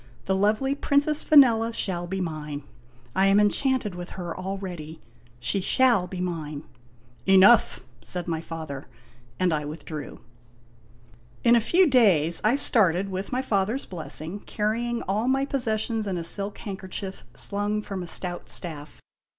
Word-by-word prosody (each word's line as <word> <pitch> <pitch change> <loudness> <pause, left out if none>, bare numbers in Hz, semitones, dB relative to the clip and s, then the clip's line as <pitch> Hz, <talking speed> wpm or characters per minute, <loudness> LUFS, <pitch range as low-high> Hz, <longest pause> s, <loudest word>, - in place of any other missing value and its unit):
"The 190 - +1
lovely 215 +8 +1
Princess 290 +1 +1
Vanella 235 -6 +5
shall 175 -2 -2
be 190 +2 -3
mine. 150 -4 -4 0.5
I 190 +1 +4
am 195 +1 +5
enchanted 225 +1 +1
with 175 0 -7
her 175 -2 -5
al 190 +1 -4
ready. 170 -5 -7 0.4
She 120 +12 -1
shall 235 -3 +3
be 185 - -7
mine." 160 -5 -4 0.3
" 120 +1 -30
Enough! 205 +5 +6
" 120 0 -30
said 175 +9 -5
my 165 -2 -2
father; 155 -5 -7 0.5
and 180 -2 +2
I 150 -1 -1
withdrew. 150 0 -7 1.3
In 235 0 +6
a 235 - +4
few 360 - +4
days 190 - +3
I 220 +5 +3
started, 195 - +4
with 190 +1 -5
my 255 +1 -1
father's 215 +2 0
blessing, 170 +1 -5
carrying 230 +4 -2
all 210 +5 -1
my 270 +1 +2
possessions 225 -5 -1
in 190 -2 -2
a 170 - -3
silk 200 +4 -3
handkerchief 190 -1 -6
slung 205 +1 -1
from 195 -3 -5
a 175 - -6
stout 175 +1 -4
staff. 150 -4 -6
195 Hz, 155 wpm, -25 LUFS, 170-225 Hz, 1.3 s, Enough